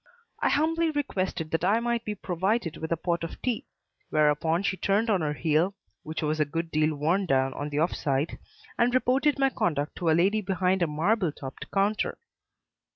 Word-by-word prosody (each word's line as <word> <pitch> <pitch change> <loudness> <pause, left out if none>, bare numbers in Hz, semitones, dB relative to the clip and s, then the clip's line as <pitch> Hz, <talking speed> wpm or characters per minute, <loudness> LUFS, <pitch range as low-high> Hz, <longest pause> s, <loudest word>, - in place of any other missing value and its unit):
I - - +2
humbly 325 +2 +2
requested 190 - -2
that 165 - 0
I 205 +5 +3
might 235 0 -1
be 210 - -3
provided 190 0 -1
with 160 +1 -5
a 165 - +2
pot 170 +1 -1
of 165 - -6
tea; 245 -3 -1 0.4
whereupon 155 +3 +2
she 195 - 0
turned 205 +4 +1
on 190 -4 +2
her 150 -1 0
heel 160 +5 +1 0.3
(which 155 +1 -5
was 155 +1 0
a - - +5
good 165 +3 -4
deal 155 0 +2
worn 170 +7 +1
down 135 -2 +2
on 145 +1 -4
the 145 +1 0
offside) 150 -3 -1 0.4
and 240 +1 +3
reported 265 +3 +2
my 270 -1 +3
conduct 150 - -1
to 170 - 0
a - - +5
lady 200 +5 +3
behind 190 -1 0
a 170 - +3
marble 175 +4 +1
topped 135 -2 -9
counter. 205 +2 0
175 Hz, 190 wpm, -27 LUFS, 155-215 Hz, 0.4 s, a